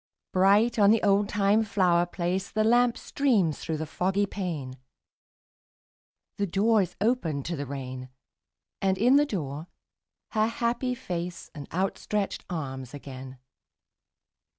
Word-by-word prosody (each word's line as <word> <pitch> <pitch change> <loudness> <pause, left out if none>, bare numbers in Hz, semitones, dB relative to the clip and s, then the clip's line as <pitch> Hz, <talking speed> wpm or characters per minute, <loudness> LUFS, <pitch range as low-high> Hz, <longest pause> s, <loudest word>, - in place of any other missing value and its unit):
Bright 205 +5 +4
on 200 -1 +6
the 225 +1 +4
oldtime 200 +1 +3
flower 180 -4 +2
place 180 +2 -2
The 215 - 0
lamp 240 +2 +3
streams 215 - +1
through 160 -2 -3
the 155 - -3
foggy 190 +6 0
pane; 155 -10 -5 1.6
The 200 - +1
door 210 +4 +3
is 180 - -3
opened 180 - 0
to 170 - -2
the 145 -2 -5
rain: 130 -2 -6 0.7
And 190 -1 +1
in 250 +7 +5
the 295 0 +3
door 155 - -4 0.6
her 215 0 +2
happy 240 +2 -1
face 180 -4 -5
And 145 -2 -9
outstretched 195 +2 -2
arms 135 -5 -5
again. 130 -2 -9
190 Hz, 130 wpm, -27 LUFS, 155-215 Hz, 1.6 s, on